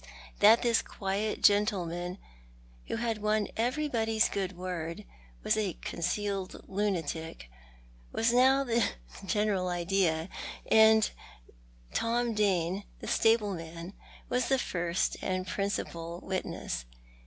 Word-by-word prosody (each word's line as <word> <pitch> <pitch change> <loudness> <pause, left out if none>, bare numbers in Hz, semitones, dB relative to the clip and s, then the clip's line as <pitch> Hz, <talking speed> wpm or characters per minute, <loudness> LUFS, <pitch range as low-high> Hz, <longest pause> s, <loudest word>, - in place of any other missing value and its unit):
That 220 +4 +7
this 235 -2 +3
quiet 200 +2 -3
gentle 205 -2 +4
man, 175 +2 -4 0.7
who - - -2
had 225 -1 -1
won 215 0 +1
everybody's 230 -3 +1
good 190 -2 -3
word, 170 -2 -4 0.4
was - - +2
a 205 -5 0
concealed 195 +3 -3
lunatic, 165 - -3 0.6
was 230 +1 +2
now 265 +2 +5
the 235 -2 +2 0.4
general 205 -2 +1
idea; 175 -2 +1 0.4
and 220 0 +7 0.9
Tom 235 0 +1
Dane, 195 -2 +1 0.2
the - - -8
stable 225 -3 +3
man, 165 +2 -7 0.3
was 250 0 0
the 270 - +3
first 175 -6 -1
and 185 0 -1
principal 175 -4 -3
witness. 185 - -3
200 Hz, 110 wpm, -30 LUFS, 175-220 Hz, 0.9 s, That